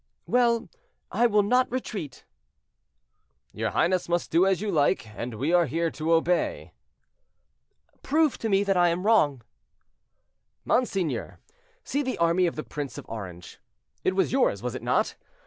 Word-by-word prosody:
"Well, 235 -1 +2 0.4
I 240 - +3
will 210 -2 +3
not 250 +5 +2
retreat." 200 - -5 1.3
"Your - - -2
highness 180 0 +1
must 175 0 -1
do 175 +4 +4
as 190 -2 +2
you 210 0 -2
like; 150 -5 +1
and 115 +3 -6
we 140 +10 -1
are 175 -2 +4
here 165 +4 -1
to 160 +2 -1
obey." 170 +2 0 1.3
"Prove 305 0 +1
to 225 - -2
me 195 0 +3
that 195 -1 +1
I 175 -1 +4
am 175 +3 -2
wrong." 145 - +3 1.2
"Monseigneur, 195 -9 -1 0.5
see 285 - -1
the 260 -2 -3
army 170 +2 +3
of 170 - -3
the 155 - -4
Prince 145 -5 -6
of - - -9
Orange. 90 -6 -8 0.4
It 185 - +1
was 190 - +1
yours, 250 - +1
was 125 -1 -3
it - - -6
not? - - +1
180 Hz, 155 wpm, -26 LUFS, 150-215 Hz, 1.3 s, do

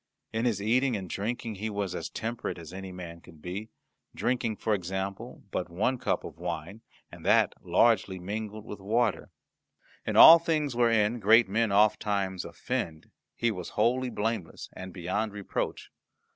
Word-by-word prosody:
In 110 +2 0
his 115 -5 +1
eating 125 +2 +2
and 95 -2 -6
drinking 115 +5 -3
he 110 - -1
was 100 -3 -3
as - - -4
temperate 115 -2 -4
as 85 0 -10
man 90 -3 -8
could 80 -3 -16
be, 95 +7 -6 0.5
drinking, 120 -3 0
for 110 - -1
example, 95 +4 -4
but 90 - -2
one 110 +9 0
cup - - -1
of - - -9
wine, 105 +3 -5 0.3
and - - -12
that - - +4
largely 110 -5 +3
mingled 105 +3 -5
with 105 - -8
water. 115 +4 0 0.7
In - - -3
all 165 +1 +11
things 155 -5 -1
wherein 115 -1 +3
great 110 +2 +6
men 110 +2 +1
ofttimes 100 -2 +2
offend 80 -2 -4 0.2
he 120 -1 +1
was 90 -5 -6
wholly 125 +4 +2
blameless 110 -6 -3
and 95 0 -8
beyond 95 +5 -2
reproach. 100 -1 -4
105 Hz, 155 wpm, -28 LUFS, 95-115 Hz, 0.7 s, all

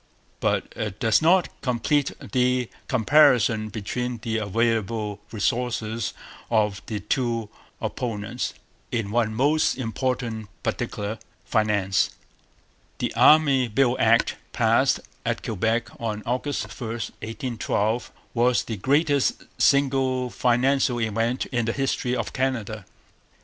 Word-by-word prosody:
But - - 0
it 105 -1 -4
does 110 -4 +3
not 175 +3 +4
complete 130 +3 +1
the 125 -1 0 0.2
comparison 125 -4 +4
between 120 +4 -3
the 110 -1 -1
available 110 -1 0
resources 115 0 -1 0.3
of 105 -3 +1
the 105 -2 -3
two 115 0 -1 0.3
opponents 115 0 -3 0.4
in 110 -4 -2
one 110 -1 +1
most 145 +5 +2
important 115 -3 -2
particular 110 -2 -3 0.3
finance. 105 -4 +1 0.8
The - - -2
Army 140 -5 +5
Bill 120 +2 +2
Act, - - +3 0.2
passed - - +3 0.2
at - - -2
Quebec 110 +3 0
on 110 -2 -3
August 130 +4 -1 0.2
1, 115 - -3
1812, 115 0 -2 0.2
was 120 +1 +3
the 110 - -5
greatest 145 - +2 0.2
single 130 -2 +2
financial 125 +1 +2
event 115 +2 0
in 120 -2 0
the 115 - 0
history 135 -2 -1
of - - -3
Canada. 115 -6 -2
120 Hz, 110 wpm, -25 LUFS, 110-130 Hz, 0.8 s, Army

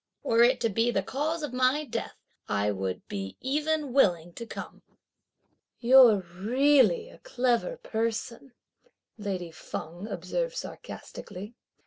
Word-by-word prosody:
were 230 -4 +3
it 250 +2 +5
to 230 - +2
be 225 +3 +1
the 195 -5 0
cause 305 - -2
of 285 -4 -4
my 255 +4 +2
death, 230 -4 -4 0.3
I 100 +1 +1
would 95 -2 -4
be 95 -1 -5
even 300 0 -1
willing 175 -10 +3
to 235 +4 -8
come!" - - -8 1.0
"You're 240 -4 +7
really 265 - +3
a - - -16
clever 255 - 0
person," 230 - -3 0.7
lady 185 -5 -4
Feng 170 +3 -7
observed - - -3
sarcastically. 205 - -8
235 Hz, 125 wpm, -28 LUFS, 190-280 Hz, 1.0 s, You're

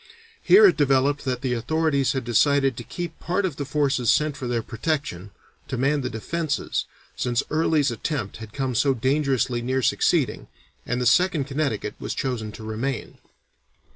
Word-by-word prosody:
Here 415 +3 +7
it 390 - +5
developed 140 0 +2
that 125 -2 -2
the 130 -2 -1
authorities 140 +2 +1
had 130 -1 -2
decided 135 +3 +3
to 120 - -7
keep 170 +5 -6
part 185 +3 -1
of 160 -7 -3
the 145 - -3
forces 135 -4 +1
sent 150 -1 +1
for 135 -3 -5
their 120 -2 -1
protection, 115 - -3 0.4
to 130 - -3
man 140 +3 +1
the 125 - -3
defences, 150 +7 -2 0.3
since 120 0 0
Early's 155 -3 +2
attempt 115 -2 -3
had 110 -2 -10
come 135 0 -2
so 135 +3 +2
dangerously 130 -1 0
near 130 +2 -1
succeeding, - - +1 0.4
and 125 +1 -1
the 125 - -1
Second 170 +3 +3
Connecticut 140 -6 -2
was - - -4
chosen 115 -5 -3
to 110 - -10
remain. 115 +4 -4
135 Hz, 170 wpm, -24 LUFS, 120-150 Hz, 0.4 s, Here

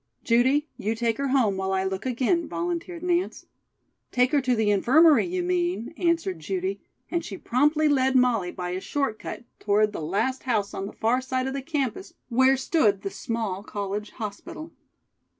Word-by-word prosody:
"Judy, 260 +6 +3
you 220 +3 -1
take 230 0 -1
her 280 - 0
home 245 -8 +2
while 190 0 -1
I 190 0 +1
look 190 +5 -3
again," 260 +7 +1
volunteered 345 0 -4
Nance. 355 +1 -1 0.7
"Take 250 0 +3
her 290 -2 +3
to 250 -1 +1
the 220 -2 +2
infirmary, 285 - +5
you 360 0 -2
mean," 350 -7 -1
answered 330 - 0
Judy, 190 +4 -3 0.3
and 340 -1 0
she 195 - -7
promptly 300 +8 +2
led 265 -2 +2
Molly 240 -8 +3
by 180 0 -5
a 185 +1 -3
short 275 -5 -2
cut - - -7 0.2
toward 210 +1 +2
the - - -4
last 205 +11 -1
house 215 -6 -1
on 195 - -4
the - - -9
far 235 +4 +1
side 260 0 -2
of 265 - -2
the 275 - -3
campus, 265 - -3
where 260 +2 +4
stood 220 - +2
the 195 - -3
small 220 -5 -3
college 205 0 -4
hospital. 315 +10 -7
250 Hz, 180 wpm, -26 LUFS, 205-295 Hz, 0.7 s, infirmary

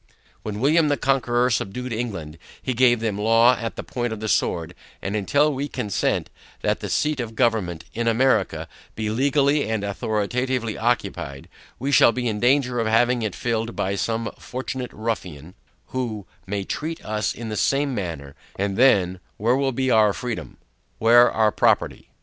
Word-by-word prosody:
When 105 -1 -5
William 155 +5 +4
the 145 -1 +1
Conqueror 125 -2 +1
subdued 125 +4 -2
England, 95 -10 -5 0.2
he 130 - -2
gave 120 -1 +4
them 105 -3 -1
law 115 +3 +5
at 115 -2 -5
the - - -5
point 120 -1 -3
of 110 - -5
the 110 - -4
sword; 85 -4 0 0.3
and 100 +2 -3
until 145 +9 +2
we 140 +2 -3
consent, 115 -8 -1 0.3
that - - +1
the - - -5
seat 150 -2 0
of 115 -2 -4
government, 110 -9 0
in 115 +1 -2
America, 125 +4 +2 0.3
be 110 -1 -2
legally 140 +2 +2
and 110 -2 -1
authoritatively 110 +4 -1
occupied, 110 - -2 0.3
we 135 +3 -2
shall 130 - +6
be 125 0 -2
in 105 -2 -1
danger 125 0 +2
of 115 - 0
having 120 +2 +3
it 110 -4 -2
filled 115 -1 -2
by 95 - -1
some 115 +2 -2
fortunate 130 0 -5
ruffian, 90 -8 -5 0.4
who 115 -6 -3 0.2
may 100 0 -2
treat 160 - -5
us 105 0 -1
in 115 -1 -6
the 110 - -3
same 140 +5 +1
manner, 80 - -5 0.2
and 100 0 -2
then, 95 -8 +4 0.2
where 115 +4 +2
will 135 0 +1
be 130 +1 0
our 110 -2 +5
freedom? 120 0 -5 0.4
Where 120 +2 +6
our 110 -1 +2
property? - - +1
115 Hz, 170 wpm, -23 LUFS, 105-130 Hz, 0.4 s, shall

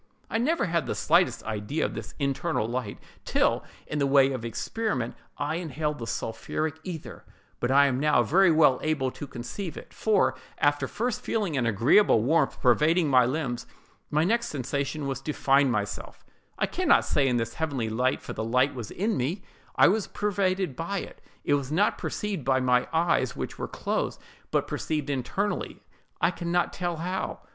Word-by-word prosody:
I 225 - +1
never 310 +5 +1
had 170 -2 0
the - - -2
slightest - - +2
idea 110 +7 -2
of - - -3
this - - -7
internal 140 -2 -1
light, 120 -3 -3 0.3
till, - - +1 0.2
in 150 - -3
the 140 - +2
way 135 -1 +5
of 130 -4 -4
experiment, 125 - -2 0.2
I 150 +3 -1
inhaled 150 -3 -3
the 115 - -5
sulphuric 155 +7 -3
ether; 170 -4 -7 0.4
but 120 - -1
I 140 +2 +6
am 130 -2 +1
now 150 -4 +4
very 180 - +4
well 155 -5 +5
able 145 -4 0
to 145 - -8
conceive 140 - -6
it: - - -11
for, 215 -3 +2 0.2
after 145 -1 +2
first 230 - -2
feeling 205 -9 -1
an 120 -4 +1
agreeable 115 - +4
warmth 160 +6 +2
pervading 155 +6 +3
my 125 -3 +5
limbs, 130 -3 -3 0.4
my 150 +1 +2
next 235 +6 +1
sensation 140 +2 -3
was 135 -1 -3
to 150 - -3
find 135 -1 +3
myself, 105 -3 -4 0.3
I - - +2
can - - -3
not - - +5
say 140 -2 +2
in 125 -2 +2
this 115 -1 -2
heavenly 140 -8 -2
light, 125 +4 0
for - - -6
the - - -3
light 125 +5 +2
was 120 -5 -6
in 215 +4 -1
me—I 155 +10 0
was 205 +2 +1
pervaded 190 -6 -1
by 170 +8 -3
it: - - -11 0.2
it - - +1
was 140 -1 0
not 195 +7 +2
perceived 200 -8 -3
by 130 0 +2
my 125 -1 +2
eyes, 165 +1 +1
which - - -5
were - - -3
closed, - - -2 0.3
but - - 0
perceived 150 -2 -2
internally, 145 +10 -2 0.4
I - - +3
can 170 -1 -4
not 175 0 +1
tell 175 -2 -2
how. 180 +4 -3
145 Hz, 185 wpm, -27 LUFS, 130-175 Hz, 0.4 s, I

